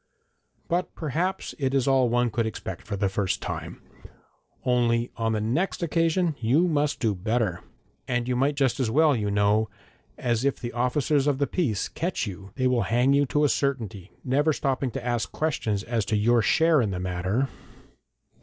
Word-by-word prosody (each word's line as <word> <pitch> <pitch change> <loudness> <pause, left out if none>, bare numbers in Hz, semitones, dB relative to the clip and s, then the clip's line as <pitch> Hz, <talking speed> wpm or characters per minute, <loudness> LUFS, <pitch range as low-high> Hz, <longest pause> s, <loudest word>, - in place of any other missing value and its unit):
But 175 +2 -1
perhaps 170 +5 -2
it 135 -1 0
is 135 -2 +2
all 130 -2 +4
one 120 0 +1
could 115 0 0
expect 110 - -6
for 100 - -2
the 100 0 +1
first 95 0 -1
time, - - -6 0.8
only 120 -1 +2
on 115 -1 0
the 110 - 0
next 150 - -1
occasion 165 +1 +1
you 135 +10 +3
must 150 -3 0
do 110 -4 +1
better. 105 -2 -1 0.5
And 120 -1 -1
you 125 - 0
might 140 +4 +1
just 135 -2 +1
as 125 -4 +1
well, 150 +4 +4
you 105 -3 -1
know, 105 +2 +2 0.5
as 120 0 0
if 140 0 0
the 120 -2 -5
officers 135 +4 +1
of 145 -2 +2
the 140 - +1
peace 125 - -1
catch 170 -6 -2
you 95 -1 -8
they 130 - -1
will 125 -2 +3
hang 125 +4 +3
you 140 0 +3
to 150 +3 +1
a - - +5
certainty, 115 -10 -2
never 145 +4 +2
stopping 135 -1 -1
to 120 - -6
ask 120 -2 -1
questions 110 -10 -1
as 115 -2 -1
to 110 - 0
your 115 +3 +3
share 160 +6 +4
in 110 - 0
the 90 -2 -3
matter.' 95 +8 -1
125 Hz, 185 wpm, -26 LUFS, 110-145 Hz, 0.8 s, a